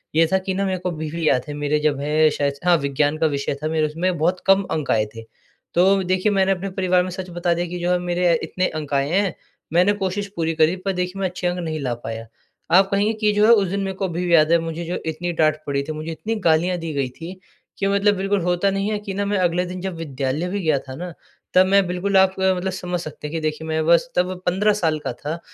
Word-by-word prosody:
ये 165 Hz, -, +5 dB
था -, -, +5 dB
कि 190 Hz, -, 0 dB
ना 195 Hz, +1 st, -1 dB
मेरे 190 Hz, -1 st, -1 dB
को 180 Hz, 0 st, -2 dB
अभी 155 Hz, -2 st, -5 dB
भी 165 Hz, -2 st, -2 dB
याद 125 Hz, -2 st, +1 dB
है, 145 Hz, -, -5 dB
मेरे 145 Hz, +1 st, 0 dB
जब 150 Hz, -2 st, 0 dB
है 155 Hz, +2 st, +3 dB
शायद 145 Hz, -1 st, -1 dB
हाँ, 175 Hz, -, +6 dB
विज्ञान 145 Hz, +1 st, 0 dB
का 160 Hz, 0 st, +2 dB
विषय 140 Hz, 0 st, -2 dB
था 155 Hz, -, +1 dB
मेरे 155 Hz, -1 st, +1 dB
उसमें 175 Hz, +3 st, -1 dB
बहुत 175 Hz, +4 st, +1 dB
कम 195 Hz, +1 st, +5 dB
अंक 155 Hz, -3 st, -1 dB
आए 110 Hz, -1 st, +2 dB
थे। 115 Hz, -, -8 dB, 0.5 s
तो 190 Hz, +2 st, +4 dB
देखिए 185 Hz, +3 st, +1 dB
मैंने 195 Hz, -1 st, +2 dB
अपने 195 Hz, +1 st, -2 dB
परिवार 185 Hz, -1 st, +1 dB
में 185 Hz, -, -4 dB
सच 185 Hz, 0 st, -6 dB
बता 175 Hz, 0 st, 0 dB
दिया 175 Hz, +1 st, -1 dB
कि 180 Hz, +1 st, -5 dB
जो 175 Hz, +1 st, 0 dB
है 180 Hz, -, +3 dB
मेरे 175 Hz, -1 st, +1 dB
इतने 185 Hz, 0 st, -1 dB
अंक 145 Hz, -1 st, -7 dB
आए 140 Hz, +1 st, +1 dB
हैं, 195 Hz, 0 st, +1 dB, 0.4 s
मैंने 180 Hz, +4 st, +4 dB
कोशिश 195 Hz, +2 st, -2 dB
पूरी 165 Hz, -1 st, -1 dB
करी 160 Hz, +2 st, +3 dB
पर 195 Hz, -, +1 dB
देखिए 180 Hz, +1 st, -3 dB
मैं 190 Hz, -, +1 dB
अच्छे 180 Hz, 0 st, -3 dB
अंक 180 Hz, 0 st, -1 dB
नहीं 160 Hz, -2 st, -3 dB
ला 125 Hz, -4 st, -2 dB
पाया। 115 Hz, 0 st, -5 dB, 0.5 s
आप 190 Hz, +2 st, +6 dB
कहेंगे 205 Hz, +2 st, +2 dB
कि 215 Hz, -1 st, +1 dB
जो 210 Hz, +1 st, +4 dB
है 230 Hz, -, +6 dB
उस 205 Hz, -5 st, +5 dB
दिन 200 Hz, +2 st, -2 dB
मेरे 190 Hz, 0 st, -3 dB
को 195 Hz, -, -1 dB
अभी 175 Hz, 0 st, -3 dB
भी 175 Hz, -, +1 dB
याद 155 Hz, -1 st, +5 dB
है 170 Hz, -, +6 dB
मुझे 165 Hz, +1 st, -4 dB
जो 175 Hz, +2 st, -3 dB
इतनी 165 Hz, +2 st, -3 dB
डाँट 155 Hz, -1 st, +3 dB
पड़ी 140 Hz, 0 st, 0 dB
थी, 155 Hz, -, -5 dB
मुझे 155 Hz, +1 st, -5 dB
इतनी 220 Hz, +7 st, -3 dB
गालियाँ 170 Hz, +3 st, +3 dB
दी 165 Hz, -1 st, -5 dB
गई 135 Hz, -3 st, -1 dB
थीं, 165 Hz, +8 st, -9 dB, 0.4 s
कि 195 Hz, -, 0 dB
मतलब 200 Hz, +1 st, +3 dB
बिल्कुल 195 Hz, +1 st, 0 dB
होता 180 Hz, +3 st, +1 dB
नहीं 195 Hz, +2 st, -1 dB
है 210 Hz, -, -1 dB
कि 205 Hz, -2 st, -6 dB
ना 200 Hz, +1 st, -1 dB
मैं 205 Hz, 0 st, 0 dB
अगले 180 Hz, 0 st, +1 dB
दिन 180 Hz, 0 st, -6 dB
जब 190 Hz, -2 st, -4 dB
विद्यालय 145 Hz, +1 st, -2 dB
भी 200 Hz, +2 st, -2 dB
गया 155 Hz, -4 st, +2 dB
था 130 Hz, 0 st, -9 dB
ना 175 Hz, +2 st, -6 dB, 0.4 s
तब 185 Hz, 0 st, +6 dB
मैं 195 Hz, 0 st, +4 dB
बिल्कुल 190 Hz, +2 st, 0 dB
आप 190 Hz, 0 st, +4 dB
अ, 190 Hz, 0 st, +3 dB
मतलब 190 Hz, +1 st, -2 dB
समझ 180 Hz, -1 st, -3 dB
सकते 155 Hz, -2 st, -7 dB
हैं -, -, -8 dB
कि 165 Hz, -, -1 dB
देखिए 155 Hz, +1 st, -3 dB
मैं 160 Hz, 0 st, 0 dB
बस 170 Hz, +9 st, +4 dB
तब 180 Hz, +1 st, +1 dB
15 200 Hz, +4 st, +2 dB
साल 160 Hz, -6 st, 0 dB
का -, -, -4 dB
था 155 Hz, +3 st, -5 dB
175 Hz, 270 wpm, -22 LUFS, 155-190 Hz, 0.5 s, हाँ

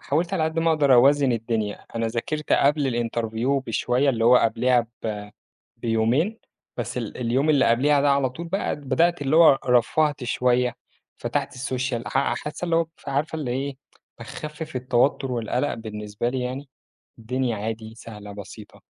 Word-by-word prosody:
حاولت 165 Hz, +6 st, -1 dB
على 160 Hz, -4 st, +1 dB
قد 160 Hz, +1 st, -2 dB
ما 165 Hz, 0 st, +3 dB
أقدر 145 Hz, -4 st, +4 dB
أوازن 135 Hz, +1 st, +5 dB
الدنيا. 115 Hz, -3 st, -2 dB
أنا 115 Hz, 0 st, -1 dB
ذاكرت 125 Hz, +7 st, -3 dB
قبل 140 Hz, -1 st, +3 dB
الinterview 120 Hz, +3 st, -1 dB
بشوية، 125 Hz, +4 st, +1 dB
اللي 115 Hz, -3 st, -1 dB
هو 125 Hz, +1 st, +7 dB
قبليها 120 Hz, +1 st, +2 dB, 0.2 s
ب 105 Hz, -2 st, -4 dB, 0.5 s
بيومين، 120 Hz, -, 0 dB, 0.4 s
بس -, -, -4 dB
ال -, -, -5 dB
اليوم 125 Hz, +5 st, +1 dB
اللي 145 Hz, -3 st, +4 dB
قبليها 140 Hz, +5 st, +3 dB
ده 140 Hz, 0 st, +3 dB
على 140 Hz, -2 st, +2 dB
طول 165 Hz, +7 st, -8 dB
بقى 195 Hz, +4 st, -1 dB
بدأت 150 Hz, +4 st, +1 dB
اللي 140 Hz, +3 st, +1 dB
هو 160 Hz, -5 st, +7 dB
رفّهت 135 Hz, +3 st, +2 dB
شوية، 125 Hz, 0 st, +1 dB, 0.4 s
فتحت -, -, -2 dB
الsocial. 130 Hz, -1 st, -3 dB
أح 135 Hz, +1 st, +1 dB
حاسة 150 Hz, +4 st, -5 dB
اللي 170 Hz, -1 st, +1 dB
هو 165 Hz, -1 st, +2 dB
فعارفة 145 Hz, +3 st, -2 dB
اللي 145 Hz, -6 st, -3 dB
إيه، 135 Hz, +2 st, -3 dB, 0.4 s
باخفّف 155 Hz, -1 st, -7 dB
التوتُّر 125 Hz, +2 st, +1 dB
والقلق 125 Hz, +4 st, -1 dB
بالنسبة 105 Hz, 0 st, -4 dB
لي 130 Hz, +1 st, -2 dB
يعني، 130 Hz, +3 st, -4 dB, 0.5 s
الدنيا 125 Hz, +1 st, -1 dB
عادي، 110 Hz, +1 st, -5 dB
سهلة، 105 Hz, -3 st, -10 dB
بسيطة. 100 Hz, +1 st, -11 dB
130 Hz, 160 wpm, -24 LUFS, 115-145 Hz, 0.5 s, هو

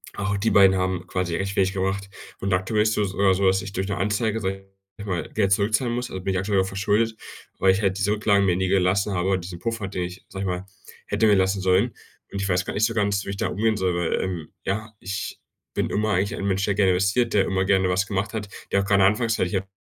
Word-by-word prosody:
auch 100 Hz, 0 st, -1 dB
die 105 Hz, +3 st, +1 dB
beiden 95 Hz, -1 st, +6 dB
haben 90 Hz, -1 st, -1 dB
quasi 90 Hz, -2 st, -2 dB
recht 100 Hz, +1 st, -2 dB
wenig 95 Hz, 0 st, +2 dB
gebracht. 95 Hz, +1 st, -2 dB, 0.3 s
Und 100 Hz, 0 st, -1 dB
aktuell 100 Hz, +4 st, +1 dB
ist 110 Hz, -, +2 dB
so 105 Hz, -, +1 dB
sogar 95 Hz, -1 st, +2 dB
so, 100 Hz, +1 st, 0 dB
dass 95 Hz, 0 st, +3 dB
ich 95 Hz, 0 st, -8 dB
durch 95 Hz, +1 st, -2 dB
'ne 100 Hz, -, -2 dB
Anzeige, 105 Hz, +4 st, 0 dB
sage 95 Hz, -1 st, -4 dB, 0.3 s
ich 105 Hz, -, -8 dB
mal, 90 Hz, -3 st, -3 dB
Geld 100 Hz, -3 st, +1 dB
zurückzahlen 110 Hz, +5 st, +2 dB
muss. 125 Hz, +1 st, -3 dB
Also 95 Hz, -, -6 dB
bin 95 Hz, -, -1 dB
ich 95 Hz, -, 0 dB
aktuell 95 Hz, 0 st, +1 dB
auch -, -, -1 dB
verschuldet, 105 Hz, +4 st, 0 dB, 0.4 s
weil 95 Hz, 0 st, +5 dB
ich 100 Hz, -, -1 dB
halt 95 Hz, -1 st, +1 dB
diese 105 Hz, 0 st, +1 dB
Rücklagen 105 Hz, -2 st, +2 dB
mir 90 Hz, -2 st, +2 dB
nie 95 Hz, 0 st, 0 dB
gelassen 100 Hz, +2 st, +2 dB
habe, 95 Hz, +1 st, +1 dB
diesen 85 Hz, 0 st, -8 dB
Puffer, 115 Hz, -4 st, -3 dB
den 90 Hz, -2 st, -3 dB
ich, 90 Hz, +1 st, -8 dB
sage 95 Hz, 0 st, -5 dB
ich -, -, -2 dB
mal, 90 Hz, +1 st, -3 dB, 0.4 s
hätte 110 Hz, +2 st, +2 dB
mir 105 Hz, -, +5 dB
lassen 95 Hz, +1 st, +2 dB
sollen. 95 Hz, +6 st, +2 dB, 0.4 s
Und 100 Hz, -, -3 dB
ich 100 Hz, -, -1 dB
weiß 90 Hz, 0 st, +2 dB
grad -, -, -4 dB
nicht 110 Hz, +2 st, +3 dB
so 115 Hz, -, -1 dB
ganz, 100 Hz, -3 st, 0 dB
wie -, -, -4 dB
ich 100 Hz, -, -5 dB
damit -, -, -2 dB
umgehen 110 Hz, 0 st, +2 dB
soll, 90 Hz, -2 st, 0 dB
weil, 85 Hz, -1 st, 0 dB
ähm, 90 Hz, -5 st, -4 dB, 0.2 s
ja, 110 Hz, +3 st, -3 dB
ich 100 Hz, +2 st, -5 dB, 0.4 s
bin -, -, 0 dB
immer 105 Hz, 0 st, 0 dB
eigentlich 95 Hz, +3 st, 0 dB
ein -, -, -3 dB
Mensch, 100 Hz, 0 st, +1 dB
der 100 Hz, -, +1 dB
gerne 95 Hz, -2 st, +3 dB
investiert, 100 Hz, +6 st, +1 dB
der 100 Hz, -, +4 dB
immer 95 Hz, -1 st, 0 dB
gerne 95 Hz, -1 st, +3 dB
was 95 Hz, +2 st, +1 dB
gemacht 105 Hz, +2 st, -2 dB
hat, 105 Hz, -2 st, -4 dB, 0.2 s
der 100 Hz, -, +3 dB
auch -, -, -3 dB
gerade 100 Hz, -1 st, +4 dB
anfangs 115 Hz, +3 st, +2 dB
ich 90 Hz, +1 st, 0 dB
habe 95 Hz, 0 st, -2 dB
100 Hz, 265 wpm, -24 LUFS, 95-105 Hz, 0.4 s, beiden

